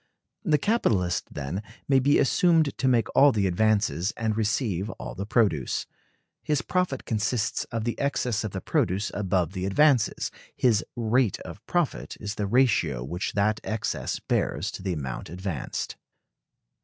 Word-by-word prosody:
The 155 Hz, -7 st, +3 dB
capitalist, 110 Hz, -, +1 dB
then, 75 Hz, +7 st, -4 dB, 0.3 s
may 135 Hz, -1 st, +5 dB
be 140 Hz, +3 st, +4 dB
assumed 160 Hz, 0 st, +3 dB
to 130 Hz, -, 0 dB
make 120 Hz, -4 st, +2 dB
all 140 Hz, +1 st, +7 dB
the 105 Hz, -5 st, +1 dB
advances 100 Hz, -1 st, +2 dB
and 110 Hz, -1 st, 0 dB
receive 105 Hz, -3 st, 0 dB
all -, -, -6 dB
the 100 Hz, +7 st, -5 dB
produce. 100 Hz, -, +1 dB, 0.6 s
His 150 Hz, -4 st, 0 dB
profit 180 Hz, -7 st, -1 dB
consists 110 Hz, +1 st, -1 dB
of 115 Hz, -2 st, -4 dB
the 120 Hz, +1 st, -2 dB
excess 125 Hz, -6 st, 0 dB
of 110 Hz, -, -2 dB
the 95 Hz, 0 st, -5 dB
produce 95 Hz, +5 st, 0 dB
above 95 Hz, -4 st, 0 dB
the 95 Hz, -1 st, -2 dB
advances; 130 Hz, +1 st, +3 dB, 0.2 s
his 115 Hz, -4 st, +3 dB
rate 120 Hz, -1 st, +1 dB
of 90 Hz, +5 st, -9 dB
profit 175 Hz, -4 st, -1 dB
is 105 Hz, -1 st, -4 dB
the 105 Hz, -2 st, -2 dB
ratio 100 Hz, -, +2 dB
which 85 Hz, +9 st, -3 dB
that 105 Hz, +2 st, +1 dB
excess 110 Hz, -1 st, -2 dB
bears -, -, -1 dB
to -, -, -8 dB
the 95 Hz, -1 st, -1 dB
amount 65 Hz, -6 st, -5 dB
advanced. 90 Hz, -4 st, -4 dB
110 Hz, 155 wpm, -26 LUFS, 95-130 Hz, 0.6 s, all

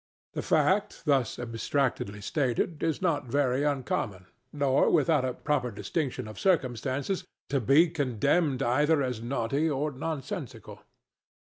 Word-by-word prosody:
The -, -, -2 dB
fact, 205 Hz, +2 st, +1 dB
thus 135 Hz, -6 st, +2 dB
abstractedly 120 Hz, -3 st, -2 dB
stated, 140 Hz, -, -1 dB
is 165 Hz, +2 st, -1 dB
not 150 Hz, -7 st, +1 dB
very 130 Hz, +1 st, +1 dB
uncommon, 125 Hz, -9 st, -1 dB, 0.3 s
nor, 140 Hz, -2 st, +2 dB
without 155 Hz, -6 st, +3 dB
a 130 Hz, -1 st, -2 dB
proper 145 Hz, -5 st, 0 dB
distinction 130 Hz, +3 st, -3 dB
of 110 Hz, -, -9 dB
circumstances, 140 Hz, -, 0 dB, 0.3 s
to 140 Hz, -1 st, +1 dB
be 140 Hz, +9 st, +5 dB
condemned 145 Hz, 0 st, +1 dB
either 145 Hz, +5 st, +3 dB
as 125 Hz, -4 st, -3 dB
naughty 135 Hz, +5 st, 0 dB
or 150 Hz, +1 st, -1 dB
nonsensical. 140 Hz, -, -6 dB
140 Hz, 125 wpm, -28 LUFS, 125-155 Hz, 0.3 s, be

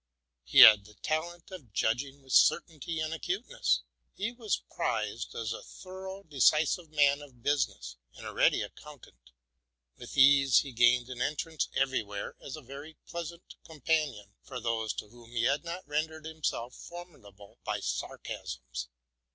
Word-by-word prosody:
He -, -, +6 dB
had 105 Hz, -2 st, +10 dB
the 105 Hz, +1 st, -16 dB
talent 170 Hz, -, -3 dB
of 145 Hz, -, -11 dB
judging 135 Hz, +7 st, -1 dB
with 130 Hz, 0 st, -7 dB
certainty 160 Hz, -1 st, +3 dB
and 155 Hz, 0 st, -2 dB
acuteness. 160 Hz, -, -1 dB, 0.3 s
He 210 Hz, +4 st, -2 dB
was 230 Hz, -5 st, -2 dB
prized -, -, -2 dB
as 115 Hz, -1 st, -2 dB
a -, -, -7 dB
thorough, 190 Hz, +1 st, -9 dB
reso 150 Hz, 0 st, +3 dB
lute 165 Hz, -3 st, -15 dB
man 145 Hz, -1 st, +3 dB
of 130 Hz, -5 st, -15 dB
business, 70 Hz, -, -1 dB, 0.2 s
and -, -, -11 dB
a -, -, -6 dB
ready -, -, +3 dB
accountant. 125 Hz, -, -13 dB, 0.7 s
With -, -, -9 dB
ease 135 Hz, -1 st, +7 dB
he 140 Hz, -, -7 dB
gained 120 Hz, +1 st, +4 dB
an 125 Hz, -1 st, -6 dB
entrance 155 Hz, +3 st, -1 dB
everywhere, 110 Hz, -7 st, -1 dB
as 140 Hz, -, -7 dB
a 155 Hz, -, -11 dB
very 140 Hz, +5 st, -10 dB
pleasant 170 Hz, 0 st, -6 dB, 0.2 s
companion 150 Hz, -9 st, -1 dB
for 130 Hz, -2 st, -7 dB
those 115 Hz, -2 st, -1 dB
to -, -, -6 dB
whom 120 Hz, 0 st, -16 dB
he 115 Hz, -1 st, 0 dB
had 140 Hz, +6 st, +2 dB
not 170 Hz, 0 st, -6 dB
rendered 155 Hz, +1 st, -2 dB
himself 155 Hz, -6 st, -3 dB
formidable 120 Hz, -, -12 dB
by -, -, -2 dB
sarcasms. 60 Hz, 0 st, -5 dB
140 Hz, 150 wpm, -30 LUFS, 115-160 Hz, 0.7 s, had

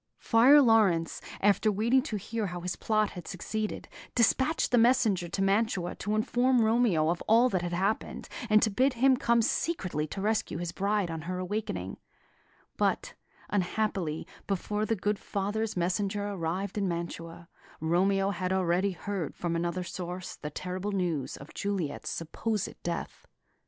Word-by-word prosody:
Friar 265 Hz, +6 st, +6 dB
Laurence, 200 Hz, -9 st, +3 dB, 0.2 s
after 205 Hz, +2 st, +3 dB
waiting 230 Hz, +6 st, +3 dB
to 245 Hz, -6 st, -3 dB
hear 215 Hz, +2 st, -3 dB
how 180 Hz, -1 st, -5 dB
his 180 Hz, +1 st, -3 dB
plot 215 Hz, -1 st, +1 dB
had 175 Hz, -3 st, -9 dB
succeeded, 215 Hz, +3 st, -4 dB, 0.3 s
despatched 260 Hz, +5 st, +2 dB
a -, -, +6 dB
messenger 225 Hz, -7 st, +3 dB
to 195 Hz, -, -1 dB
Mantua 195 Hz, -3 st, +1 dB
to 210 Hz, +1 st, -2 dB
inform 245 Hz, +2 st, +2 dB
Romeo 220 Hz, -9 st, +3 dB
of 170 Hz, -, -1 dB
all 235 Hz, +3 st, +5 dB
that 185 Hz, -6 st, 0 dB
had 175 Hz, 0 st, -3 dB
happened, 195 Hz, +5 st, -1 dB, 0.2 s
and 215 Hz, 0 st, +5 dB
to 220 Hz, -, +2 dB
bid 260 Hz, +6 st, +2 dB
him 260 Hz, +2 st, +4 dB
come 235 Hz, -2 st, +2 dB
secretly 185 Hz, -, -1 dB
to 195 Hz, -, -6 dB
rescue 215 Hz, -3 st, 0 dB
his 175 Hz, 0 st, -3 dB
bride 200 Hz, -1 st, 0 dB
on 160 Hz, -1 st, -4 dB
her 185 Hz, -, -2 dB
awakening; 180 Hz, -, -3 dB, 0.8 s
but, -, -, 0 dB, 0.4 s
unhappily, 190 Hz, -4 st, -1 dB, 0.2 s
before 210 Hz, +2 st, -1 dB
the 225 Hz, -, +1 dB
good 205 Hz, +1 st, -1 dB
father's 205 Hz, +1 st, -2 dB
messenger 200 Hz, +3 st, -1 dB
arrived 190 Hz, +2 st, -3 dB
in 200 Hz, -, 0 dB
Mantua, 170 Hz, -1 st, -5 dB, 0.3 s
Romeo 195 Hz, +4 st, +2 dB
had 185 Hz, 0 st, -2 dB
already 190 Hz, +1 st, +1 dB
heard 185 Hz, -2 st, -4 dB
from 170 Hz, -1 st, -2 dB
another 175 Hz, +2 st, -1 dB
source 180 Hz, 0 st, -6 dB
the 150 Hz, -, -6 dB
terrible 185 Hz, +5 st, -4 dB
news 175 Hz, -8 st, -1 dB
of 140 Hz, -, -12 dB
Juliet's 190 Hz, -8 st, -3 dB
supposed 210 Hz, +5 st, -3 dB
death. -, -, -5 dB
195 Hz, 155 wpm, -29 LUFS, 175-220 Hz, 0.8 s, Friar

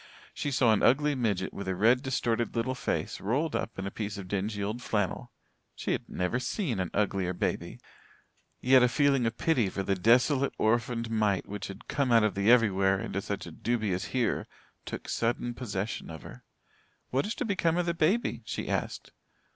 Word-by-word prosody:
She 145 Hz, -, -2 dB
saw 125 Hz, -4 st, +4 dB
an 105 Hz, -, +1 dB
ugly 145 Hz, +3 st, +4 dB
midget 105 Hz, -8 st, -1 dB
with 100 Hz, -, -6 dB
a 95 Hz, -, 0 dB
red, 120 Hz, +6 st, +4 dB
distorted 120 Hz, -4 st, -1 dB
little 120 Hz, +3 st, 0 dB
face, 125 Hz, -, -3 dB
rolled 140 Hz, +10 st, 0 dB
up 115 Hz, -, -3 dB
in 95 Hz, -, -4 dB
a 100 Hz, -, -3 dB
piece 105 Hz, -1 st, -4 dB
of 95 Hz, -2 st, -7 dB
dingy 100 Hz, +2 st, -2 dB
old 110 Hz, +5 st, -3 dB
flannel. 105 Hz, -5 st, -2 dB, 0.4 s
She -, -, -3 dB
had -, -, -2 dB
never 90 Hz, +7 st, -1 dB
seen 130 Hz, -, -2 dB
an 90 Hz, -2 st, -1 dB
uglier 95 Hz, -3 st, 0 dB
baby. -, -, -3 dB, 0.8 s
Yet 130 Hz, 0 st, +6 dB
a 125 Hz, -, +5 dB
feeling 135 Hz, -2 st, +3 dB
of 115 Hz, -, -3 dB
pity 130 Hz, -12 st, +2 dB
for 95 Hz, -, -3 dB
the 100 Hz, -, +1 dB
desolate, 125 Hz, -, +3 dB
orphaned 115 Hz, +1 st, 0 dB
mite 105 Hz, -4 st, +1 dB
which 100 Hz, -1 st, -5 dB
had 100 Hz, +1 st, -10 dB
"come 140 Hz, -4 st, 0 dB
out 115 Hz, -2 st, +6 dB
of 105 Hz, -2 st, +2 dB
the 100 Hz, +2 st, +1 dB
everywhere" 95 Hz, -5 st, +4 dB
into 100 Hz, 0 st, -3 dB
such 100 Hz, 0 st, -4 dB
a 85 Hz, -, -8 dB
dubious 105 Hz, -1 st, -1 dB
"here", 125 Hz, -3 st, -1 dB, 0.4 s
took -, -, -6 dB
sudden 120 Hz, +1 st, -1 dB
possession 110 Hz, -4 st, -4 dB
of 80 Hz, -3 st, -8 dB
her. -, -, -12 dB, 0.7 s
"What 135 Hz, +9 st, +1 dB
is 220 Hz, -, -3 dB
going -, -, -26 dB
to -, -, -1 dB
become 175 Hz, -6 st, +1 dB
of 180 Hz, -, +1 dB
the 170 Hz, -, 0 dB
baby?" 185 Hz, +8 st, +1 dB
she -, -, -4 dB
asked. -, -, -3 dB
115 Hz, 195 wpm, -29 LUFS, 100-130 Hz, 0.8 s, Yet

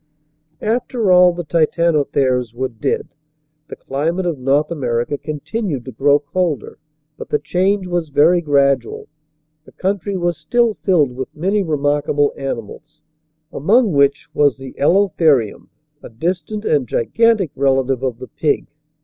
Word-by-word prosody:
After 230 Hz, -2 st, 0 dB
all 180 Hz, 0 st, +7 dB
the 175 Hz, 0 st, -5 dB
Titanotheres 145 Hz, -7 st, +1 dB
were 130 Hz, +1 st, -2 dB
dead, 115 Hz, -3 st, -3 dB, 0.6 s
the -, -, -8 dB
climate 165 Hz, +7 st, -2 dB
of 165 Hz, -6 st, -2 dB
North 140 Hz, +4 st, +1 dB
America 125 Hz, -3 st, -1 dB
continued 150 Hz, -, -4 dB
to 130 Hz, -, -7 dB
grow 140 Hz, +5 st, +3 dB
colder, 145 Hz, -1 st, -3 dB, 0.4 s
but -, -, -9 dB
the -, -, +2 dB
change 185 Hz, +6 st, 0 dB
was 175 Hz, -3 st, -2 dB
very 155 Hz, +5 st, +4 dB
gradual. 140 Hz, -5 st, +1 dB, 0.6 s
The -, -, -17 dB
country 195 Hz, +1 st, -2 dB
was 175 Hz, -2 st, -1 dB
still 240 Hz, -2 st, +1 dB
filled 165 Hz, -10 st, +1 dB
with 130 Hz, +1 st, -6 dB
many 195 Hz, +6 st, 0 dB
remarkable 145 Hz, -3 st, 0 dB
animals 140 Hz, +4 st, -7 dB, 0.5 s
among 215 Hz, -, +3 dB
which 140 Hz, 0 st, +2 dB
was 145 Hz, -3 st, +2 dB
the 135 Hz, -1 st, -10 dB
Elotherium, 160 Hz, -, +2 dB, 0.3 s
a -, -, -10 dB
distant 175 Hz, -, -3 dB
and 145 Hz, -, +1 dB
gigantic 210 Hz, -, +1 dB
relative 135 Hz, -1 st, +1 dB
of 130 Hz, -3 st, -2 dB
the 130 Hz, +1 st, -9 dB
pig. 150 Hz, -, -1 dB
150 Hz, 135 wpm, -18 LUFS, 135-180 Hz, 0.6 s, all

